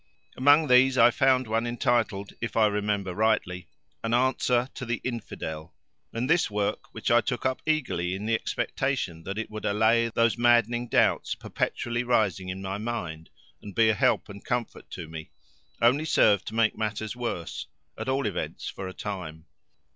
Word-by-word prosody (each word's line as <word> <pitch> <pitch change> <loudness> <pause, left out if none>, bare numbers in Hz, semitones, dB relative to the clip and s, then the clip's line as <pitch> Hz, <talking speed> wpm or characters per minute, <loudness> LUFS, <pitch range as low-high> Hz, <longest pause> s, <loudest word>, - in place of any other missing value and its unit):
Among 145 +4 +5
these 130 +1 +5
I 120 - +7
found 130 0 +3
one 115 +1 -1
entitled, 115 -4 0
if 120 - -3
I 110 - +5
remember 105 -2 -1
rightly, 90 -4 0 0.4
An 115 +1 +1
Answer 125 -1 +2
to - - -7
the 120 -2 -2
Infidel, 85 -10 -6 0.4
and 115 +2 -2
this 165 -2 +3
work, 105 -1 -2
which - - -3
I 120 0 +6
took 125 -2 -3
up 130 0 0
eagerly 95 - 0
in 100 +2 -5
the 115 - 0
expectation 115 -6 -2
that 95 +2 -4
it 110 - -4
would 110 0 -7
allay 110 +3 +3
those 115 +1 +1
maddening 120 0 +3
doubts - - +2
perpetually 120 0 -2
rising 105 -6 +1
in 95 +1 -5
my 95 +1 -3
mind 90 -8 -5 0.3
and 100 -2 -10
be 115 -1 +4
a - - +4
help 105 - +2
and 100 0 -11
comfort 120 -2 -3
to 85 - -7
me, 80 0 -8 0.5
only 135 +6 +4
served 105 - +3
to 110 - -5
make 115 -1 +2
matters 110 0 -3
worse, 115 -11 -4 0.3
at 110 +4 -5
all 135 +1 0
events - - -4
for 95 - -6
a 95 - -7
time. 85 -6 -6
110 Hz, 175 wpm, -27 LUFS, 100-120 Hz, 0.5 s, I